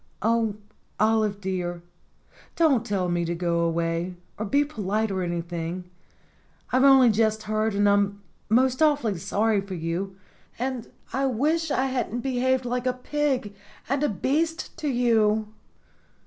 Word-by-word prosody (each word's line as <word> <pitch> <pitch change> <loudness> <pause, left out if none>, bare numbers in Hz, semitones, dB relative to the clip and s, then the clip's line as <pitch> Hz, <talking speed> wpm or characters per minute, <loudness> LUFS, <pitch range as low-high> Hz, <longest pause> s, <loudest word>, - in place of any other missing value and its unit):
"Oh, 225 -1 +2 0.4
Olive 215 -2 +2
dear! 180 -3 -3 0.7
don't 290 -9 +3
tell 200 -5 -1
me 175 0 0
to 170 0 -2
go 170 -1 0
away, 170 +1 -1 0.2
or 215 - -4
be 285 +7 +3
polite 215 -5 -1
or 190 -1 -1
anything. 175 +1 -4 0.8
I've 255 +1 +4
only 265 -3 +7
just 220 0 +1
heard, 215 0 0
and 205 0 +3
I'm 200 0 +2 0.3
most 255 +4 +3
awfully 285 - +2
sorry 210 +4 +1
for 195 -1 -6
you. 175 +4 -3 0.4
And 255 -1 -3 0.3
I 270 +1 +1
wish 305 +7 +1
I 270 -2 +1
hadn't 250 -2 -2
be 260 -1 -2
haved 260 0 +2
like 250 +1 -1
a 255 - +2
pig 260 -4 -1 0.3
and 275 +2 0
a 295 - +2
beast 315 - -1
to 310 - -2
you. 220 -4 +2
220 Hz, 150 wpm, -25 LUFS, 190-260 Hz, 0.8 s, only